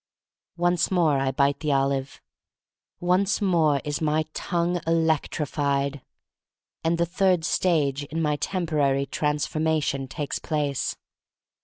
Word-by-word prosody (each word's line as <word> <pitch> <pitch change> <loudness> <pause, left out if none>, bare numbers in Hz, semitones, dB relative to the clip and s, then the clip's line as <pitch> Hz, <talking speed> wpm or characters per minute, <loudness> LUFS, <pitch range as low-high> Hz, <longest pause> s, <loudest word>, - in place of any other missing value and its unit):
Once 175 0 +2
more 165 -7 +2
I 135 0 +1
bite 140 +1 +1
the 150 -2 -1
olive. 135 0 -1 0.8
Once 185 +3 +2
more 165 -7 +3
is 150 +2 -2
my 155 0 +1
tongue 175 0 -1
electrified. 145 -3 0 0.8
And 165 +1 +1
the 170 - +2
third 180 -1 +1
stage 145 -6 +1
in 160 +3 -4
my 150 -2 +1
temporary 150 -7 0
trans 150 +2 -1
formation 155 -4 -1
takes 145 +2 -4
place. 145 -4 -1
155 Hz, 120 wpm, -25 LUFS, 140-170 Hz, 0.8 s, more